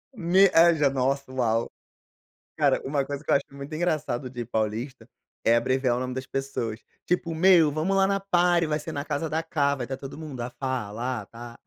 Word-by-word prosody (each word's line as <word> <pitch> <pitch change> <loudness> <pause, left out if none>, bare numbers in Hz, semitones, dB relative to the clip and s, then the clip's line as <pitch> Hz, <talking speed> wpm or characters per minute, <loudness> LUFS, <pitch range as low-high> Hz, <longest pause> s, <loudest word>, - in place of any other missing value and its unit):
Me 190 0 +4 0.3
já 145 -2 +3
a - - +3
nossa, 135 0 -1
uau. 115 -3 0 0.9
Cara, - - +3
uma 140 0 -1
coisa 145 +1 -5
que - - -14
eu - - +5
acho - - +1
muito 140 +2 -9
engraçado 155 -7 -1
de 120 -1 -5
paulista, 115 +2 -3 0.4
é 115 - +5
abreviar 130 +1 +1
o - - -2
nome 130 0 -3
das 130 0 -4
pessoas. 125 -5 -3 0.3
Tipo: 170 -2 -1
"Meu, 165 -3 +5
vamos 160 +6 0
lá 195 0 +4
na 195 0 +1
party, 175 -3 +2
vai 155 0 -1
ser - - -7
na 140 +1 -4
casa 150 +1 -2
da 160 +2 -1
Cá, 140 -3 +1
vai 125 -3 -4
estar 135 +1 -5
todo 135 +1 -9
mundo, 145 -6 -7
ah, 120 - -3
Fa, 135 - -4 0.2
a 115 0 -4
Ta, 120 0 -10
a - - -17
140 Hz, 215 wpm, -26 LUFS, 125-160 Hz, 0.9 s, eu